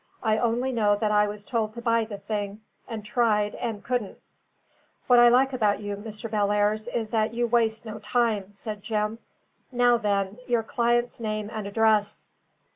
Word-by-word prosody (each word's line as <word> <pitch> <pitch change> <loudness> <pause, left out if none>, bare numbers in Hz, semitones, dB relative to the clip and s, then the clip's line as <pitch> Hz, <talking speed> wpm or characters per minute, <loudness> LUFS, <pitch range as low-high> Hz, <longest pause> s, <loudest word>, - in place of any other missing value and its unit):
"I 220 -1 +2
only 240 +2 0
know 210 -4 +2
that 210 +1 0
I 210 0 +4
was 205 0 -7
told 225 -4 -2
to 235 - -6
buy 230 -1 +2
the 210 -2 -7
thing, 205 0 -4 0.3
and 220 -3 -6
tried, 210 -2 +1
and 225 -4 -4
couldn't." 245 -5 -2 0.9
"What 245 -1 +6
I 240 0 +8
like 265 +3 +3
about 210 -5 +1
you, 205 -1 -4
Mr. 215 +2 -7
Bellairs, 210 0 +1
is 230 -3 -3
that 220 0 0
you 240 0 +1
waste 225 -1 +1
no 220 -1 -7
time," 215 -2 0
said 210 +1 -7
Jim. 215 +1 -2 0.5
"Now 245 -1 +4
then, 200 -1 -1
your 240 -2 +1
client's 240 +2 0
name 215 -1 -3
and 215 -2 -4
address." 215 0 +1
220 Hz, 175 wpm, -26 LUFS, 210-235 Hz, 0.9 s, I